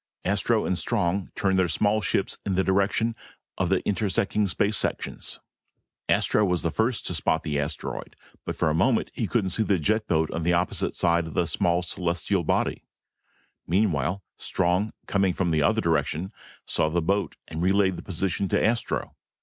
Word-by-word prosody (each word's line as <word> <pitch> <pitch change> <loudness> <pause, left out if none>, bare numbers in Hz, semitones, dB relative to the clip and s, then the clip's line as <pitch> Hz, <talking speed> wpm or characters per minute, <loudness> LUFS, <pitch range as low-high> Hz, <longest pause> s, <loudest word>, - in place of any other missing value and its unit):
Astro 105 +3 +1
and 95 - 0
Strong 85 +2 -1
turned 95 -1 +1
their 90 - +3
small 105 +5 +2
ships 90 - 0
in 95 - -1
the 95 - +2
direction 100 +4 +1 0.4
of 90 -3 +1
the 95 -1 +1
intersecting 100 0 +1
space 100 +4 +1
sections. - - 0 0.7
Astro 105 - +3
was 90 -3 +1
the 85 - 0
first 110 +6 0
to - - -2
spot 80 - 0
the 75 -2 -1
asteroid, 75 +1 -4 0.3
but - - -4
for 80 - +1
a - - 0
moment 110 +9 +2
he 110 - -2
couldn't 100 -5 0
see 110 - 0
the 100 -3 +2
jet 110 +6 0
boat 80 -2 +1
on 85 - -3
the 85 +2 +2
opposite 85 +1 0
side 85 -1 +2
of 80 - -9
the 90 - +2
small 85 +2 +1
celestial 90 +1 -1
body. - - 0 0.8
Meanwhile, 90 -1 +1
Strong, 90 +5 0
coming 95 -2 +1
from 85 -2 0
the 80 -1 +2
other 75 - +3
direction, 95 +7 0 0.3
saw 80 - +1
the 85 +1 0
boat 100 +4 0
and 80 +1 -5
relayed 95 +1 +3
the - - -7
position 95 +1 -1
to - - +2
Astro. 115 +1 -1
95 Hz, 180 wpm, -26 LUFS, 85-100 Hz, 0.8 s, their